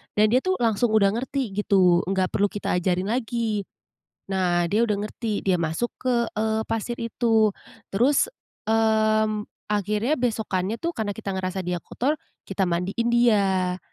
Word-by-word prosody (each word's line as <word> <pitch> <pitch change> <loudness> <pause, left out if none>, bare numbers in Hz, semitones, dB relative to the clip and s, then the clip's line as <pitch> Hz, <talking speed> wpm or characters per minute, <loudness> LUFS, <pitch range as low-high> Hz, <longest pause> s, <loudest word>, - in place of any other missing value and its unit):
nah 210 - +4
dia 250 - +5
tuh 375 +7 0
langsung 225 0 +2
udah 200 -2 +5
ngerti 255 0 -2
gitu, 185 -4 +4
nggak 190 -1 0
perlu 205 - +2
kita 205 0 -4
ajarin 185 +2 0
lagi. 225 -4 -1 0.6
Nah, 175 -2 +1
dia 230 +3 +3
udah 210 - +1
ngerti, 215 0 -3
dia 185 -2 +2
masuk 165 +9 -1
ke, 255 -1 0 0.2
eee, 220 +1 0
pasir 225 +2 -2
itu, 225 -2 +2 0.4
terus, 255 - +3 0.4
mmm, 215 -1 +2 0.3
akhirnya 210 - 0
besokannya 215 -4 -1
tuh, 335 - -1
karena 205 -3 -2
kita 205 -3 -5
ngerasa 190 0 -3
dia 180 0 -2
kotor, 290 - -2 0.3
kita 195 -1 0
mandiin 180 +7 -1
dia. 195 -6 +2
215 Hz, 150 wpm, -24 LUFS, 190-230 Hz, 0.6 s, dia